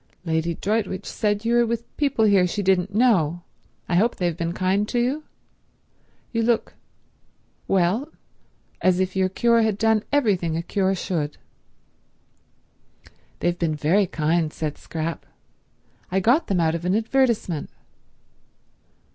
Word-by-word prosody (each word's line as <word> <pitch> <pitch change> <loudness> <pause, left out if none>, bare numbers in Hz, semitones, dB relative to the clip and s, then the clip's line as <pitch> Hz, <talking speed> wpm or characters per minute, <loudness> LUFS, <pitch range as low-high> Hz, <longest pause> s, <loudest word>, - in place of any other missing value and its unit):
Lady 165 0 0
Droitwich 200 -1 -2
said 210 0 -1
you 235 - +2
were 240 0 +4
with 235 0 -4
people 275 -6 +1
here 195 -3 +4
she 200 +3 -3
didn't 190 +1 +1
know. 175 -9 +2 0.4
I 175 - +1
hope 230 +5 +2
they've 175 -3 -1
been 170 0 -2
kind 190 +3 0
to - - -1
you? 265 +6 0 1.1
You 230 - 0
look—well, 220 - -3 0.7
as 185 -1 +3
if 190 0 -1
your 190 -1 +2
cure 235 +4 +3
had 220 -3 +1
done 220 0 +2
everything 195 - +1
a 165 - -3
cure 195 +1 0
should." 155 -5 -3 2.0
"They've 175 0 0
been 160 -3 0
very 180 +7 +2
kind," 160 0 0
said 155 -2 -4
Scrap. 165 0 -4 0.9
"I 190 - +2
got 240 - +3
them 190 -3 +1
out 160 -1 +2
of 170 0 -4
an 180 +2 +1
advertisement." 225 - 0
190 Hz, 135 wpm, -23 LUFS, 170-225 Hz, 2.0 s, were